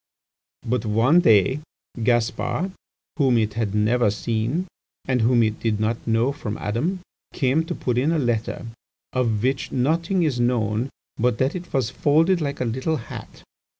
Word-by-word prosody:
"But 120 -1 0
one 115 +10 +4
day, 130 - +4 0.4
Gaspar, 120 - 0 0.5
whom 130 -5 +3
it 110 -2 0
had 105 -2 -2
never 110 +2 +3
seen, 115 - -1 0.4
and 130 -2 +1
whom 120 +1 +4
it 110 -1 -1
did 110 -2 0
not 110 +2 -2
know 115 +4 +2
from 115 -7 -5
Adam, 155 - -2 0.3
came 135 +4 +2
to - - -4
put 125 -1 -1
in 145 +5 +2
a 165 - +1
letter, 120 -4 -1 0.5
of 115 -4 0
which 135 +1 0
nothing 165 +8 +1
is 140 -6 0
known 120 0 +1 0.3
but 120 0 +1
that 130 +3 +1
it 180 -1 -7
was 130 -4 0
folded 160 +7 +3
like 140 -1 -3
a 125 - 0
little 130 +7 -1
hat. 115 - -10
125 Hz, 160 wpm, -23 LUFS, 115-145 Hz, 0.5 s, one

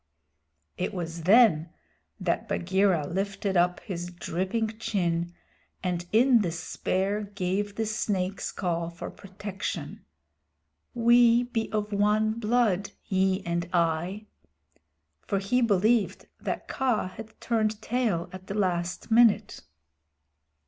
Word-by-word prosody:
It 185 +3 -2
was 165 -2 -5
then 195 -6 +5 0.5
that - - -1
Bagheera 185 -3 +2
lifted 195 +3 -2
up 175 0 +3
his 175 -3 -5
dripping 190 +6 -3
chin, 175 -5 -1 0.5
and 175 -1 -2
in 235 +1 +5
despair 190 +4 -1
gave 200 +2 -1
the 220 - -1
Snake's 200 -3 -2
Call 170 -2 -2
for 170 0 -7
protection 190 -5 -6 0.9
"We 235 0 +5
be 230 -2 -3
of 210 -1 -2
one 210 +2 +2
blood, 215 -4 +1 0.2
ye 190 -1 +1
and 170 0 -2
I" 175 +4 0 1.0
for 200 - +1
he 200 +6 +1
believed 220 0 +2
that - - -4
Kaa 250 -8 0
had 220 +3 -11
turned 220 -2 0
tail 225 -10 -1
at 185 0 -10
the 195 - -4
last 180 0 -1
minute. 230 -1 +4
195 Hz, 115 wpm, -27 LUFS, 175-220 Hz, 1.0 s, then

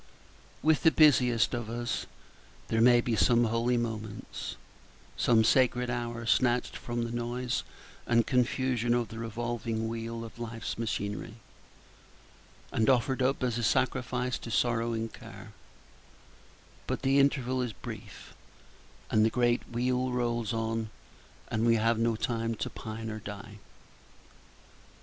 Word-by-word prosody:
With 155 0 +4
the 160 - +7
Page 150 -6 +7
34 125 - +1
busiest 115 0 +1
of 120 -2 -3
us 120 0 -3 0.6
there 115 - +2
may 120 0 +6
be 120 -1 0
some 120 +2 +4
holy 115 +2 +1
moments, 110 -3 -4 0.6
some 115 -2 +4
sacred 125 +1 +3
hour 120 -1 -3
snatched 120 +1 +2
from 120 -1 -3
the 115 - -4
noise 120 +1 -2 0.5
and 115 -1 +3
confusion 125 -2 +1
of 120 -2 -1
the 115 - -8
revolving 115 0 -3
wheel 115 0 -4
of 115 - -12
Life's 115 -1 -5
machinery, 105 0 -3 1.4
and 110 +2 +2
offered 130 +1 +2
up 130 +1 +1
as 120 -2 0
a - - -2
sacrifice 125 +1 0
to - - -8
sorrow 115 0 +1
and 115 0 -3
care; - - -11 1.4
but - - -2
the 135 +1 +4
interval 130 -2 +2
is 125 -2 -2
brief, - - -9 0.8
and 110 - +4
the 110 - +4
great 120 0 +2
wheel 125 +2 0
rolls 120 -2 -1
on, 115 -1 -2 0.6
and 110 0 0
we 115 0 +5
have 115 +1 +2
no 115 0 +2
time 115 0 -1
to - - -4
pine 110 0 -6
or 110 - -5
die. 105 +1 -9
120 Hz, 140 wpm, -30 LUFS, 115-125 Hz, 1.4 s, the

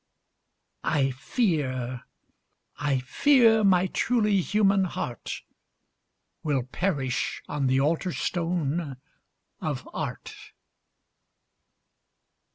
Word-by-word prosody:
I 135 -3 +2
fear, 130 - -1 0.7
I 145 -2 +1
fear 225 - +4
my 185 -2 +5
truly 210 -1 +2
human 195 0 +3
heart 125 -8 -5 1.0
Will 140 -5 0
perish 135 -2 -2
on 145 -2 -1
the 130 +1 +3
altar 165 +5 +1
stone 165 -5 -2 0.6
of - - -4
art! - - -5
160 Hz, 75 wpm, -27 LUFS, 135-195 Hz, 1.0 s, my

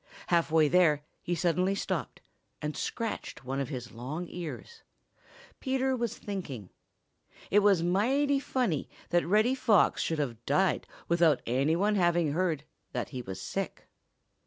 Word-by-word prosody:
Half 170 -2 +3
way 155 -1 +5
there 155 -3 +4 0.2
he 175 - -1
suddenly 180 +3 +1
stopped - - -3 0.4
and 150 0 -3
scratched 225 - -4
one 135 +2 -2
of 140 - -2
his 125 -4 -6
long 135 +9 -5
ears. 180 - -7 0.8
Peter 265 -1 0
was 235 -2 -2
thinking. 145 - -6 0.8
It 205 - +6
was 200 -4 +4
mighty 270 +11 +2
funny 245 - -1 0.2
that 175 -1 +2
Reddy 215 +7 +4
Fox 225 -6 +3
should 160 - -1
have 120 -6 -3
died 185 +7 +2 0.2
without 170 -4 +3
any 135 +7 +2
one 205 +4 +2
having 175 -4 +3
heard 160 -3 0 0.3
that - - -2
he 130 -3 -5
was 95 -5 -7
sick. 95 - -4
175 Hz, 145 wpm, -30 LUFS, 145-205 Hz, 0.8 s, It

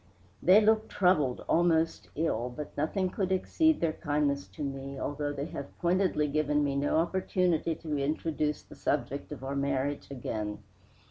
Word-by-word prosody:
"They 190 +4 +7
look 220 +1 +3
troubled, 155 -9 +2
almost 165 -1 +2
ill, 125 -7 0
but 145 +4 -7
nothing 180 +5 0
could 190 -2 -1
exceed 315 - +2
their 165 -2 +1
kindness 145 -3 0
to 150 - -7
me, 135 0 -5
although 145 +1 -2
they 140 0 -3
have 140 -3 -8
pointedly 175 -3 +2
given 150 0 +1
me 140 -1 0
no 145 +2 +1
opportunity 175 -1 +1
to 155 -2 -3
introduce 150 +1 -1
the - - -14
subject - - -2
of 130 - -7
our 135 +1 -3
marriage 140 0 -1
again. 110 -6 -4
150 Hz, 155 wpm, -30 LUFS, 140-175 Hz, -, They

